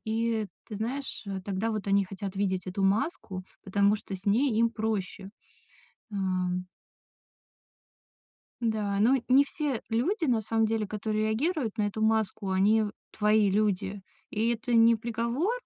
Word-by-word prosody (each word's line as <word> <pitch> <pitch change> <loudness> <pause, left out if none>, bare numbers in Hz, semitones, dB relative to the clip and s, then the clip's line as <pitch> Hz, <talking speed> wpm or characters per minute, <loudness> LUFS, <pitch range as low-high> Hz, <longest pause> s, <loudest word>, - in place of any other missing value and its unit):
И 225 0 0 0.2
ты 215 - -6
знаешь, 255 +6 -4
э, 195 -1 -4
тогда 200 +3 -1
вот 215 -3 -3
они 200 0 +4
хотят 195 0 -6
видеть 190 -2 -1
эту 185 +2 -3
маску, 195 - -1 0.2
потому 200 +1 +3
что 195 -1 -7
с 185 - -16
ней 235 +5 +3
им 230 0 +4
проще, 210 -3 -3 0.8
ам. 185 -2 -1 2.0
Да, 215 -4 0
но 230 +6 +5
не 265 +2 +6
все 285 -4 -2
люди, 315 - 0
на 240 -5 +2
самом 225 +1 +1
деле, 220 -1 0
которые 215 +1 -2
реагируют 245 - -1
на - - +2
эту 215 +2 -3
маску, 220 -2 +1
они 205 +4 +4
в 205 -1 -3 0.2
твои 210 -1 +4
люди. 200 -1 0 0.3
И 220 +2 0
это 235 +1 -1
не 230 0 +6
приговор, 235 - -1
215 Hz, 150 wpm, -28 LUFS, 200-230 Hz, 2.0 s, не